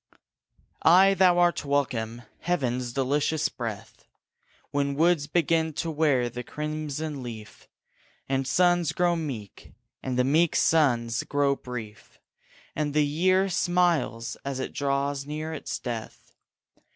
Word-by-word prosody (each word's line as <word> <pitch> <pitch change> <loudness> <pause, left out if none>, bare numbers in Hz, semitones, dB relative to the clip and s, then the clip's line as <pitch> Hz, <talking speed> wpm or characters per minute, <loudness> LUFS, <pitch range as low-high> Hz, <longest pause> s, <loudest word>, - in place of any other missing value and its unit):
Ay, 190 +4 +6
thou 185 -2 +4
art 175 -1 +2
welcome, 120 -5 -1 0.2
heaven's 125 -8 -1
delicious 145 +4 0
breath, 115 -5 -7 0.6
When 140 -1 0
woods 160 -1 +2
begin 160 0 +1
to 165 +2 -3
wear 145 -5 +2
the 120 +1 -6
crimson 150 0 -4
leaf, 110 -3 -9 0.6
And 135 -1 -1
suns 175 0 +2
grow 175 0 +2
meek, 130 - -7 0.3
and 130 -1 -3
the 125 - +4
meek 155 +5 +2
suns 120 -7 +2
grow 145 -1 +1
brief, 115 -5 -9 0.6
And 150 -1 -2
the 150 -1 +4
year 185 +6 +2
smiles 175 -11 0
as 135 -1 -4
it 130 - -4
draws 140 0 -1
near 155 +2 -4
its 155 - -4
death. 115 -3 -7
145 Hz, 125 wpm, -26 LUFS, 125-165 Hz, 0.6 s, Ay